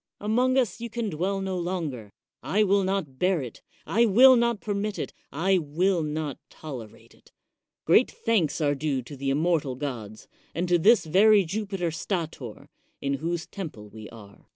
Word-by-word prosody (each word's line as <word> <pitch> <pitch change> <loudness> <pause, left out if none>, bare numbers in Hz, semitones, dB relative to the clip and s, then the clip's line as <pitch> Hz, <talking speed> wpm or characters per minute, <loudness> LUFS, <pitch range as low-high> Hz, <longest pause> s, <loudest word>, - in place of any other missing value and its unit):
Among 250 +5 +1
us 230 -4 0
you 235 - -4
can 225 -2 -3
dwell 190 +5 -1
no 190 -1 -2
longer 160 - -4 0.2
— - - -67 0.2
I 215 - +6
will 200 0 +3
not 185 -9 -2
bear 180 -1 +2
it, 120 - -9 0.2
I 230 +3 +3
will 255 +6 +7
not 235 -2 +1
permit 205 0 -3
it, - - -5 0.2
I 185 +5 +2
will 170 +4 0
not 150 -2 -3
tolerate 125 -9 -10
it. - - -24 0.5
Great 200 +10 +5
thanks 205 -11 0
are 145 -1 +2
due 140 -2 -2
to 130 +5 -10
the 135 0 -3
immortal 150 -2 +1
gods, 120 -6 -6 0.3
and 175 +3 -1
to 175 -1 +4
this 215 +4 +5
very 200 +4 +5
Jupiter 195 -2 -3
Stator, 160 - -5 0.3
in 140 0 -2
whose 170 +1 -2
temple 150 - -8
we 110 0 -11
are. 100 -3 -15
175 Hz, 175 wpm, -26 LUFS, 145-200 Hz, 0.5 s, will